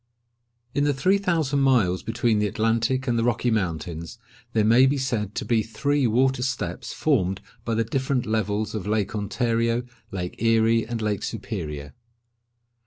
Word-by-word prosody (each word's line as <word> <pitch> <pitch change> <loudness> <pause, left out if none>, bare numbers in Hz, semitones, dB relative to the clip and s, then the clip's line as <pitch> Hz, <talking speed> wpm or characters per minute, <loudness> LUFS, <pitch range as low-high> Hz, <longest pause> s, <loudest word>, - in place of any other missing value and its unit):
In 145 - +1
the 145 -1 +2
three 185 +9 +3
thousand 160 -7 +1
miles 120 -10 +3
between 115 -1 +1
the 105 - +2
Atlantic 115 +5 0
and 120 -1 +1
the - - +1
Rocky 120 0 +1
Mountains, 85 -3 -3 0.4
there 110 - +3
may 120 +4 +6
be 140 +2 +1
said 115 -6 -2
to - - -3
be 115 -2 +2
three 140 +5 0
water 130 +3 +2
steps 125 -2 -3
formed 95 - +1 0.2
by 115 -1 -1
the 115 - +2
different 130 +2 -1
levels 110 -1 -1
of 105 -3 -4
Lake 105 -2 0
Ontario, 115 +3 0 0.3
Lake 90 0 -5
Erie, 115 0 +3
and 115 -1 -3
Lake 105 -1 -1
Superior. 80 -10 -5
115 Hz, 160 wpm, -25 LUFS, 105-130 Hz, 0.4 s, may